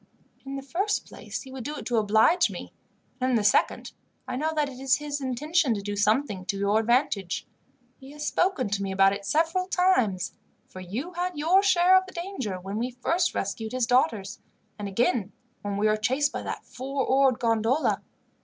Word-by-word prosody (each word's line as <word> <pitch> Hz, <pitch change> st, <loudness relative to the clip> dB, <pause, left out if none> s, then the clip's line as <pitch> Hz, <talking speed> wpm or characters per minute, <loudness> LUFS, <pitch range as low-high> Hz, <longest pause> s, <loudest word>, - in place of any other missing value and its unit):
In 275 Hz, -, -4 dB
the 275 Hz, -, -5 dB
first 385 Hz, +9 st, -1 dB
place, -, -, -7 dB
he 265 Hz, -, -12 dB
would 260 Hz, -2 st, -7 dB
do 295 Hz, +4 st, -4 dB
it -, -, -7 dB
to 240 Hz, -, 0 dB
oblige 220 Hz, -, +4 dB
me, -, -, -8 dB, 0.5 s
and 255 Hz, 0 st, +1 dB
in 255 Hz, -, +2 dB
the 220 Hz, -, +2 dB
second, 205 Hz, -, +2 dB, 0.4 s
I -, -, -3 dB
know 310 Hz, +5 st, 0 dB
that 300 Hz, -1 st, +1 dB
it 260 Hz, -2 st, -9 dB
is 265 Hz, -1 st, +3 dB
his 290 Hz, +1 st, -4 dB
intention 275 Hz, +1 st, +1 dB
to 200 Hz, -, -4 dB
do 205 Hz, 0 st, -3 dB
something 210 Hz, -1 st, +1 dB
to 200 Hz, -, -2 dB
your 200 Hz, +2 st, +2 dB
advantage. 225 Hz, -5 st, 0 dB, 0.5 s
He 265 Hz, -1 st, -12 dB
has 300 Hz, 0 st, -6 dB
spoken 330 Hz, -, +1 dB
to 200 Hz, 0 st, -1 dB
me 195 Hz, -1 st, -2 dB
about 195 Hz, 0 st, +4 dB
it 200 Hz, 0 st, -6 dB
several 330 Hz, -, +1 dB
times, 255 Hz, -, +1 dB, 0.3 s
for 185 Hz, -, -11 dB
you 230 Hz, -, -5 dB
had 355 Hz, -1 st, -3 dB
your 340 Hz, +6 st, +4 dB
share 370 Hz, -2 st, +5 dB
of 375 Hz, 0 st, +3 dB
the 375 Hz, -, -11 dB
danger 340 Hz, -, -4 dB
when 195 Hz, +4 st, -5 dB
we 245 Hz, +2 st, -1 dB
first 295 Hz, +8 st, 0 dB
rescued 220 Hz, +3 st, -3 dB
his 255 Hz, -2 st, +1 dB
daughters, 230 Hz, -4 st, +1 dB, 0.4 s
and 205 Hz, -, -4 dB
again 230 Hz, 0 st, 0 dB, 0.3 s
when 200 Hz, -1 st, -3 dB
we 205 Hz, -, +1 dB
were 215 Hz, 0 st, +3 dB
chased 265 Hz, +6 st, +1 dB
by -, -, -3 dB
that -, -, -6 dB
four 270 Hz, +1 st, -3 dB
oared 265 Hz, -2 st, +3 dB
gondola. 230 Hz, +5 st, +1 dB
255 Hz, 200 wpm, -26 LUFS, 210-300 Hz, 0.5 s, share